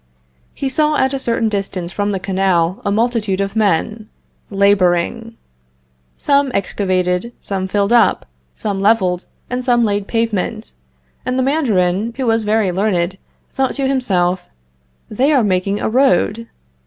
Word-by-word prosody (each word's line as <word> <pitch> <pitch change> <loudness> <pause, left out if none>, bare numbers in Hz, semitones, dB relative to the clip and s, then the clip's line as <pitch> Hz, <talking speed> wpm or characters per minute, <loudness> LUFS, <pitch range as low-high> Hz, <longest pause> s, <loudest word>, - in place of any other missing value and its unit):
He 275 - -3
saw 300 +3 +1
at 265 +1 +1
a 275 - -2
certain 230 -3 0
distance 195 -4 -3
from 205 +2 -1
the 195 - -2
canal 185 -2 0
a 200 - -1
multitude 215 -2 0
of 195 +1 -2
men 215 +1 0 0.4
laboring. 200 +3 +1 0.8
Some 280 -1 +2
excavated, 185 +2 -1
some 190 -1 -3
filled 200 +3 +1
up, 235 -2 +3 0.3
some 200 -2 -3
leveled, 190 -4 +2 0.2
and 250 0 -3
some 240 -2 +3
laid 205 -1 -1
pavement, 225 -1 -2 0.5
and 255 0 -2
the 260 - +2
Mandarin, 225 - 0
who 265 - -2
was 225 -1 +2
very 210 -2 +1
learned, 190 -1 -1 0.3
thought 270 -1 -1
to 275 -1 0
himself: 185 -9 0 0.7
They 260 +7 +1
are 265 -5 +3
making 195 +1 0
a - - -1
road. 230 -2 +2
210 Hz, 140 wpm, -17 LUFS, 190-240 Hz, 0.8 s, up